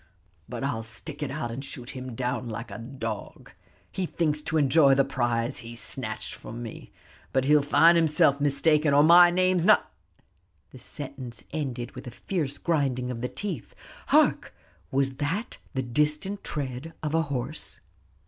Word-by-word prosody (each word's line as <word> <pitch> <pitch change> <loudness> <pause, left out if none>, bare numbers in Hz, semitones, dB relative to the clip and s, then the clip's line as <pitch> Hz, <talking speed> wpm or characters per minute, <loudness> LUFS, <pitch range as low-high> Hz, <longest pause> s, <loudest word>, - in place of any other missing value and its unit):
But 125 0 -5
I'll 125 -5 -1
stick 125 +7 -8
it 145 - -2
out, 135 -4 -3
and 130 +4 -5
shoot 135 -2 -7
him 130 -2 -7
down 125 0 -2
like 115 +2 -6
a - - -7
dog. 115 -3 -6 0.4
He 185 -2 -2
thinks 150 -3 0
to 155 +1 -1
enjoy 140 -1 +5
the 135 0 +3
prize 120 -3 -1
he 115 0 -9
snatched 115 - -3
from 120 +2 -8
me, 115 - -9 0.4
but 130 0 +1
he'll 150 +1 +5
find 165 +4 +5
himself 150 -4 +3
mistaken, 145 +1 +3
or 145 - +7
my 175 +2 +8
name's 185 0 +2
n 215 - +8 0.5
" 85 -1 -42
The 130 - -12
sentence 130 -3 -7
ended 130 -6 -3
with - - -10
a - - -3
fierce 145 +2 -3
grinding 135 -6 0
of 115 -2 -5
the 125 - -2
teeth. 185 - -6 0.3
Hark! - - +3 0.3
was 135 -1 0
that 165 +10 -3 0.2
the 130 - 0
distant 150 +10 0
tread 140 +2 -4
of 155 0 -2
a 165 - +3
horse? 140 0 -3
140 Hz, 165 wpm, -27 LUFS, 125-155 Hz, 0.5 s, my